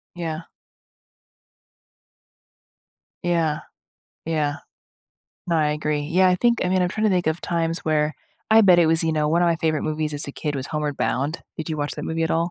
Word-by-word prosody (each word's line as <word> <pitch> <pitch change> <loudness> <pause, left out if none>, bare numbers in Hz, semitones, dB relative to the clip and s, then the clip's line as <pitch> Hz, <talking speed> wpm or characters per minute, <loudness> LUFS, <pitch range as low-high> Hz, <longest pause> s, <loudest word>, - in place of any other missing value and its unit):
Yeah. 165 -1 -4 2.8
Yeah. 165 -3 0 0.7
Yeah. 150 -3 -1 0.9
No, 170 -2 +1
I 155 -1 +2
agree. 150 0 -1
Yeah, 175 +5 +3
I 180 - +4
think 235 +3 +2
I - - +1
mean, 185 0 +2
I'm 180 - +1
trying 215 +3 -2
to 215 - +4
think 180 -1 +1
of 160 +2 -1
times 165 -1 -1
where 155 -1 +1 0.4
I 220 +1 +7
bet 180 -4 +6
it 170 - +4
was 165 +1 +4
You 160 - +1
know, 150 -1 +1
one 170 +2 +2
of - - +3
my 170 -1 +2
favorite 160 -1 0
movies 155 0 -2
as 145 0 -3
a 140 - -6
kid 150 -1 -3
was 130 - -4
Homeward 150 -2 -3
Bound. 145 +6 -1 0.2
Did 160 - -5
you 155 - -2
watch 145 0 -2
that - - -6
movie 165 0 -1
at - - -2
all? 165 +2 0
160 Hz, 200 wpm, -23 LUFS, 150-175 Hz, 2.8 s, I